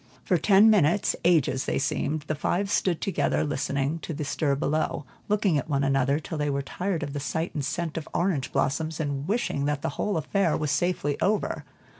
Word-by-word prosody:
For 180 -4 +2
ten 205 +4 +6
minutes, 190 -1 +3
ages 150 -6 +3
they - - 0
seemed, 150 +2 -1
the 150 - -2
five 180 +6 -1
stood 180 -5 +1
together 150 -8 0
listening 140 +1 -1
to 160 - -6
the 150 0 -3
stir 140 +1 0
below, 150 0 -1 0.2
looking 200 -7 +2
at 155 - -7
one 140 -1 +1
another, 135 0 +2
till 160 0 -6
they 150 0 0
were 140 0 -1
tired 180 +3 -3
of 140 -1 -5
the 145 - -3
sight 160 +5 -2
and 150 -4 -2
scent 165 +4 -3
of 160 - -5
orange 170 -6 0
blossoms, 155 +4 -1
and 145 -1 -2
wishing 200 -9 0
that 145 -1 -1
the - - 0
whole 205 -4 0
affair 170 +2 +1
was 150 -2 -1
safely 150 -2 0
over. 210 +1 0
155 Hz, 200 wpm, -26 LUFS, 140-175 Hz, 0.2 s, ten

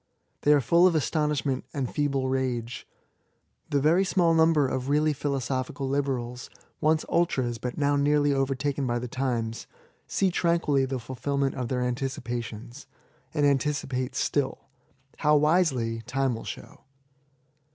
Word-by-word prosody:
They 145 - +4
are 145 - +4
full 170 +8 +5
of 175 - +1
astonishment 150 -2 0
and 135 -3 -1
feeble 140 -2 -1
rage. 125 -3 -2 0.8
The 145 - +2
very 160 +7 +4
small 175 -3 +2
number 160 -3 +4
of 130 +1 -3
really 150 +1 +3
philosophical 135 -1 -2
liberals— 130 -3 -2 0.3
once 155 +1 +2
ultras^ 130 -9 0
but 125 -1 -4
now 145 -1 +2
nearly 145 0 +3
overtaken 135 0 -1
by 120 0 0
the 125 +1 -4
times 120 -3 -3 0.2
— - - -34
see 190 -2 +1
tranquilly 170 -6 +2
the 130 0 -3
fulfil 130 +3 -4
ment 140 -1 +1
of 125 -2 -3
their 125 0 -1
anticipations^ 120 -1 -4 0.5
and 145 -2 +2
anticipate 140 -2 0
still 140 -2 -1 0.2
— 135 +1 -32
^how 150 -1 +4
wisely, 140 -8 +1
time 135 0 0
will 115 - -7
show. - - -9
135 Hz, 145 wpm, -27 LUFS, 125-150 Hz, 0.8 s, full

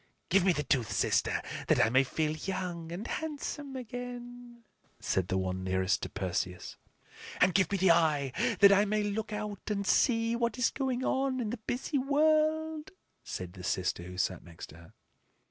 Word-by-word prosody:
"Give 190 +1 +4
me 190 - +4
the 150 -3 -1
tooth, 125 -5 0
sister, - - +1 0.2
that - - +3
I 110 - +4
may 130 +2 +5
feel 155 +3 -1
young 175 -2 -4
and 185 +6 -5
handsome 290 -2 -4
again," 245 -1 -8 0.4
said 95 -2 0
the 95 - 0
one 95 0 -2
nearest 95 0 +1
to - - -4
Perseus. 90 -2 -3 0.6
"And 180 0 +4
give 190 -1 +2
me 200 - +1
the 190 -1 +5
eye 155 -5 +2 0.3
that 200 0 +9
I 200 +1 +5
may 210 0 0
look 215 +2 -3
out 210 -1 -5
and 200 -1 -1
see 230 +1 +3
what 235 -2 -1
is 250 - +2
going 260 -2 -2
on 265 -1 0
in 220 -4 -2
the 245 - -3
busy 250 +6 -2
world," 310 +2 +1 0.3
said 90 -1 -6
the 90 -2 -10
sister 90 -1 -1
who 90 +1 -9
sat 95 0 -1
next 85 -1 -11
to 80 - -13
her. 85 0 -16
200 Hz, 180 wpm, -30 LUFS, -, 0.6 s, that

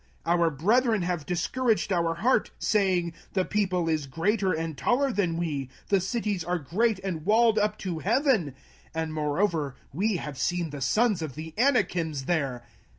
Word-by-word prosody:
our 170 0 +3
brethren 215 - +2
have 175 -4 -2
discouraged 205 +4 0
our 170 -2 +1
heart, 240 +10 +2
saying, 185 -5 +1 0.2
The 185 -2 +1
people 185 -5 0
is 155 -3 0
greater 190 +7 0
and 160 -1 -2
taller 265 - +1
than 180 -7 0
we; 145 -6 -2 0.2
the 195 -2 +3
cities 205 -2 -2
are 180 +2 -1
great 205 - 0
and 175 -5 -3
walled 220 +3 +4
up 210 0 0
to 170 -4 -2
heaven; 220 - +1 0.4
and 160 -1 -2
moreover 155 -2 0 0.2
we 200 +7 +1
have 150 -5 -5
seen 175 -3 -1
the 145 -1 -7
sons 210 - +2
of 155 -5 -5
the 160 +1 -7
Anakims 180 - +1
there. 135 -8 -1
175 Hz, 160 wpm, -27 LUFS, 160-210 Hz, 0.4 s, walled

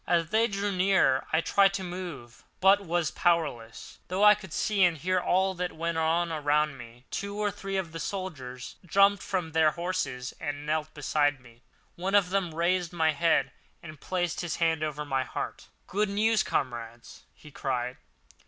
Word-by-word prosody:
As 170 -1 +1
they 225 +2 +3
drew 200 -1 -2
nearer 185 -8 +2
I 160 - +3
tried 195 +2 +3
to 190 - -3
move, 175 -10 -7 0.2
but 195 +2 +5
was 170 -3 -1
powerless, 155 -10 -1
although 185 +3 0
I 210 0 +9
could 205 -5 -9
see 205 +3 +1
and 175 -2 +3
hear 185 +5 0
all 190 +2 +1
that 180 0 -3
went 165 0 -2
on 165 +1 +1
around 150 -1 +1
me. 120 0 -13
Two 200 +1 -4
or 210 -1 0
three 195 0 -4
of 180 -4 -3
the 165 - -6
soldiers 135 -12 -6
jumped 200 +3 +4
from 180 -4 -3
their 160 -1 +4
horses 150 -7 -3
and 145 -1 -4
knelt 155 0 -1
beside 145 -1 +1
me. 120 -1 -19 0.4
One 190 +3 -1
of 190 -3 +4
them 185 -5 -1
raised 175 +1 +1
my 160 -2 +2
head, 165 +2 +2 0.3
and 155 -3 -10
placed 175 -3 -2
his 175 -2 -3
hand 165 -2 +1
over 150 -1 -3
my 135 -2 0
heart. - - -6 0.2
"Good 205 +2 0
news, 215 +2 +2
comrades!" 120 -2 -4
he 150 - -15
cried. 125 -3 -3
170 Hz, 180 wpm, -28 LUFS, 145-190 Hz, 0.4 s, I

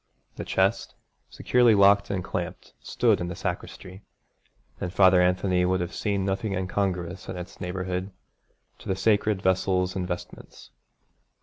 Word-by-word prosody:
The - - -6
chest, 100 +5 0 0.3
securely 120 -3 +3
locked 100 0 +5
and 95 -3 -2
clamped, - - -5
stood - - +1
in 85 - -2
the 85 - -5
sacristy; 95 +2 -6 0.8
and 90 - -4
Father 95 -1 +5
Anthony 90 0 +2
would 90 +1 +1
have 90 0 -4
seen 100 -3 -1
nothing 95 +1 -2
incongruous 95 -1 -3
in - - -5
its 90 0 -9
neighbourhood 90 +1 -3 0.7
to - - -13
the 95 - 0
sacred 105 0 +1
vessels 95 0 +1
and 90 -2 -2
vestments. 90 -1 -8
95 Hz, 140 wpm, -26 LUFS, 90-100 Hz, 0.8 s, locked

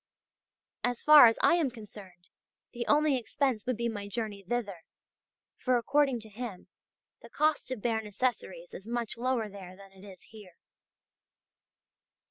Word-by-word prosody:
As 245 -1 -2
far 300 -4 +9
as 225 - +2
I - - +6
am 315 -6 +1
concerned 205 -6 -13 0.4
the 235 0 -5
only 295 -2 +3
expense 250 -2 -2
would 255 -3 -1
be 235 0 -1
my 205 -3 -5
journey 205 -1 -5
thither; 200 -1 -3 0.8
for, 255 -1 +1
according 270 0 +1
to 220 - -8
him, 215 -3 -8 0.5
the - - -13
cost 305 -2 0
of 255 -5 -5
bare 225 -2 0
necessaries 255 - -3
is 195 - -10
much 235 -1 -3
lower 240 -2 -1
there 190 -3 -11
than 195 0 -15
it 190 0 -17
is 195 -3 -13
here. 205 -6 -15
230 Hz, 150 wpm, -29 LUFS, 205-255 Hz, 0.8 s, far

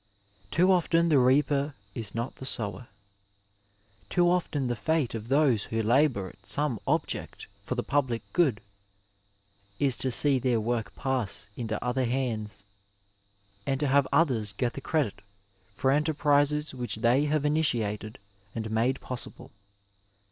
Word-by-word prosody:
Too 180 - +3
often 170 -2 +3
the 145 -4 +5
reaper 140 +2 +2 0.2
is 110 -2 -6
not 115 +3 -4
the 130 - -8
sower. 115 +1 -2 1.2
Too 175 -1 +3
often 175 -6 0
the 120 -1 -1
fate 145 +4 0
of 115 -1 -5
those 135 -5 +3
who 110 0 -2
labour 120 -4 +2
at 100 - -19
some 145 -7 -1
object - - -2 0.2
for 115 +5 -4
the 120 - -2
public 130 -5 0
good 145 -12 +2 1.2
is 135 -3 +3
to 130 - 0
see 135 +2 +5
their 125 -2 +1
work 110 -2 -2
pass 125 -6 -2
into 110 -3 -3
other 125 +1 0
hands, 115 -5 -3 1.0
and 135 -1 0
to 150 - 0
have 140 0 +3
others 115 -11 +2
get 120 +4 -1
the 140 - -7
credit 145 -7 -1 0.5
for 130 +5 +1
enterprises 150 0 +2
which 125 -2 -3
they 120 +6 +2
have 150 0 0
initiated 115 -9 0 0.4
and 110 -1 -4
made 120 +4 +1
possible. 125 -1 -7
130 Hz, 140 wpm, -28 LUFS, 115-145 Hz, 1.2 s, the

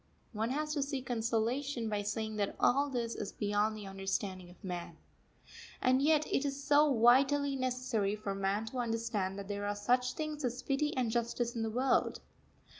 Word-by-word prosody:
One 220 +2 -1
has 300 +3 -1
to 295 - 0
seek 275 -2 -3
consolation 235 +2 -1
by 210 -1 -1
saying 215 +1 -3
that 200 -1 -1
all 280 +3 +3
this 235 -3 -2
is 205 - -5
beyond 210 +1 0
the 210 - -8
understanding 195 -1 -3
of 180 - -18
man. 175 -3 -5 0.8
And 255 +1 +3
yet, 305 +1 +4
it 270 - 0
is 280 0 -3
so 295 +1 +5
vitally 275 +4 +4
necessary 250 -5 0
for 210 -2 -4
man 195 +2 -1
to 250 +3 -5
understand 225 -5 -1
that 200 -1 -6
there 205 0 -3
are 205 - -1
such 250 +4 +1
things 305 -1 -4
as 250 +1 -2
pity 290 +1 0
and 245 -3 +1
justice 235 0 -1
in 230 - -2
the 225 - 0
world. 255 +4 +1
235 Hz, 185 wpm, -33 LUFS, 205-270 Hz, 0.8 s, so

